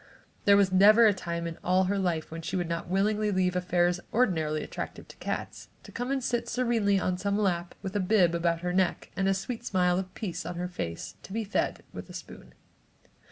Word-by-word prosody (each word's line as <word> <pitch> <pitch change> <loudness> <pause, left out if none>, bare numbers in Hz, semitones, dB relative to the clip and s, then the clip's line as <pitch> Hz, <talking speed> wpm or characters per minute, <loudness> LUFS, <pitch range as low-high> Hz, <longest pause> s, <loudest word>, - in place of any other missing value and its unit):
There 200 0 +7
was 195 -2 +3
never 210 +5 +7
a 210 - +6
time 170 -2 -4
in 165 -1 -5
all 185 +1 +3
her 195 +2 0
life 170 -5 -1
when 165 0 -6
she 165 - -4
would 175 -2 -1
not 170 +1 -4
willingly 210 +3 +1
leave 185 -2 +1
affairs 180 -1 +1
ordinarily 160 -10 +1
attractive - - -6
to - - -12
cats, - - -5
to - - -12
come 245 +2 -4
and 270 -1 -1
sit 240 -1 -1
serenely 230 -5 +2
on 180 -1 -1
some 200 +1 0
lap, 175 -4 -1
with 190 +1 -5
a - - +2
bib 185 -3 +3
about 170 0 0
her 180 0 -2
neck, 185 -1 0
a 195 0 +2
sweet 230 +4 -4
smile 180 -4 +2
of 185 -1 -5
peace 180 -4 -4
on 175 - -5
her 180 +1 -3
face, 85 - -6
to - - -12
be 225 +2 -1
fed 205 - -1
with - - -8
a - - -10
spoon. - - -10
185 Hz, 215 wpm, -28 LUFS, 175-205 Hz, -, There